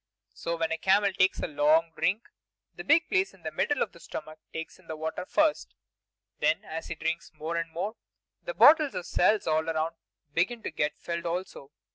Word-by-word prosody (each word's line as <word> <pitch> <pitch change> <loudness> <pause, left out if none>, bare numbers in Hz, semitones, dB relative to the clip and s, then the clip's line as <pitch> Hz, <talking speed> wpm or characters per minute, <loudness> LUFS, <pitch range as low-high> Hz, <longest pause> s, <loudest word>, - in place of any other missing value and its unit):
So 170 0 -3
when 165 0 -1
a 165 - -1
camel 195 +2 +3
takes 185 +1 +3
a - - -5
good 150 -3 -5
long 160 +3 +4
drink, 200 +5 +1 0.5
the - - -8
big 330 +3 +4
place 375 - +1
in 180 - -24
the 155 - -3
middle 285 - +1
of - - -6
the 170 - -16
stomach 155 -1 -8
takes 160 0 -7
in - - -22
the 160 - -4
water 160 +3 -4
first; 310 -1 +1 0.6
then - - +1
as 160 +1 -6
he - - -4
drinks 165 +2 -3
more 160 +2 -4
and 165 0 -2
more, 190 +7 -4 0.5
the - - -6
bottles 305 -2 +7
or 180 - -3
cells 210 +4 +2
all 160 +1 +1
around 160 +1 -1 0.4
begin 210 +8 0
to - - -3
get 150 -1 -1
filled 170 0 -4
also. 170 -5 -4
170 Hz, 205 wpm, -28 LUFS, 160-205 Hz, 0.6 s, bottles